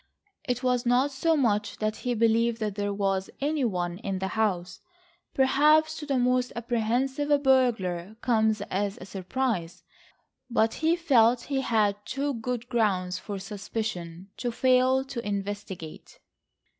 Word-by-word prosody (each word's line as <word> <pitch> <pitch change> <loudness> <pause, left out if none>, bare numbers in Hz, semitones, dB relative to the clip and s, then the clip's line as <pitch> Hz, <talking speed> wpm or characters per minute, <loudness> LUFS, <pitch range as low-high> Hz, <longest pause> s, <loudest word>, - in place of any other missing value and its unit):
It 250 0 -2
was 250 -1 +1
not 250 +3 +2
so 320 +4 +1
much 210 -5 0
that 215 0 -2
he 245 -1 -2
believed 230 +1 +2
that 215 -2 -2
there 205 0 -2
was 195 -1 -1
any 295 0 0
one 180 -5 -1
in 195 -3 -3
the 190 0 -3
house—perhaps 300 - 0
to 300 - -7
the 275 -2 +1
most 250 0 +1
apprehensive 245 +5 -1
a 290 - +5
burglar 220 -9 +1
comes 220 -4 +2
as 200 +1 -1
a 185 - -9
surprise—but 220 +3 -3
he 320 +1 +1
felt 250 -8 +4
he 270 +1 -2
had 210 -4 +1
too 275 +4 -2
good 245 0 -4
grounds 190 -7 0
for 205 0 -6
suspicion 195 -3 -5
to 245 - -2
fail 255 +2 +3
to 245 -3 -5
investigate. 200 -5 -6
230 Hz, 140 wpm, -27 LUFS, 200-265 Hz, -, a